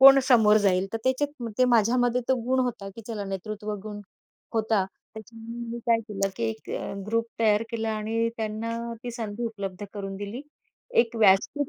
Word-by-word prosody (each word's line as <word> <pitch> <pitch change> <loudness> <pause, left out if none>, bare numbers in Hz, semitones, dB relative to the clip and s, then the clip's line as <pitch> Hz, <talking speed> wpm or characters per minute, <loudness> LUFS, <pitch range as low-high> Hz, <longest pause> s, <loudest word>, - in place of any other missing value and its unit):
कोण 275 0 +11
समोर 215 -4 +7
जाईल, 195 -2 +3
तर 225 - -1
त्याच्यात 280 +1 0
मग 230 - -3
ते 255 - +6
माझ्यामध्ये 245 +1 +3
तो 260 - +5
गुण 260 +1 +2
होता, 210 -5 -4
की 230 - -8
चला 215 -3 -4
नेतृत्वगुण 210 +1 -5 0.5
होता. 220 -3 +2 0.3
त्याच्यामध्ये 230 +2 -8
मी 235 - -4
काय 230 -1 +4
केलं, 195 -1 0
की - - -4
एक 145 +7 -9 0.4
ग्रुप 230 +1 +1
तयार 215 -1 +4
केला 225 -1 -1
आणि 225 +2 0
त्यांना 225 +1 -3 0.2
ती 245 - -4
संधी 230 -1 -4
उपलब्ध 200 -3 -4
करून 195 -2 -5
दिली. 205 +5 -5 0.6
एक 235 -1 -1
व्यासपीठ 215 +7 +4
225 Hz, 170 wpm, -27 LUFS, 205-235 Hz, 0.6 s, कोण